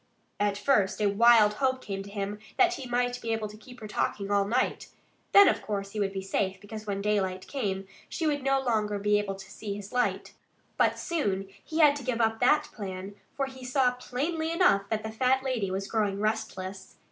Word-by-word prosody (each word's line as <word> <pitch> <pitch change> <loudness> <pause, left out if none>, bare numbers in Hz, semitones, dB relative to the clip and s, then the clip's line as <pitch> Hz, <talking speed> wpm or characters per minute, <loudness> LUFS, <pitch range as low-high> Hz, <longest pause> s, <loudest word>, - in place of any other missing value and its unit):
At 205 -1 +1
first 205 -4 +2
a 210 - +2
wild 220 0 +6
hope 260 -1 +2
came 195 -5 -5
to 200 - -9
him 200 0 -4 0.2
that 360 -2 +5
he 265 -8 -7
might 245 0 0
be 230 -1 -1
able 220 -1 -2
to 210 - -11
keep 245 +3 -14
her 215 - -6
talking 205 -1 -2
all 200 -1 +3
night. 245 +5 0 0.4
Then, 400 0 +9
of - - +2
course, 200 -2 -4
he 215 - -4
would 200 -1 0
be 195 -1 -4
safe; 190 -1 -1
because 215 +2 -9
when 200 -1 -2
daylight 190 -3 0
came 195 -8 -3 0.2
she 330 - -3
would 290 -2 +1
no 270 0 +2
longer 215 -5 0
be 205 +1 +2
able 195 -1 -3
to 195 0 -12
see 205 -1 -5
his 205 +1 -9
light. 250 0 0 0.4
But - - +3
he - - -15
soon 195 - -2 0.3
had 300 -3 +6
to 280 - -8
give 245 -1 -1
up 225 -1 +1
that 255 +5 +3
plan, 195 -2 -6 0.2
for 275 - +1
he 260 -1 -10
saw 255 0 +2
plainly 295 +6 -3
enough 265 - +3
that 215 -1 -1
the 220 - -4
fat 260 +4 +2
lady 245 -7 -1
was 190 +1 -2
growing 205 -3 0
restless. 195 -3 -3
215 Hz, 215 wpm, -28 LUFS, 200-255 Hz, 0.4 s, Then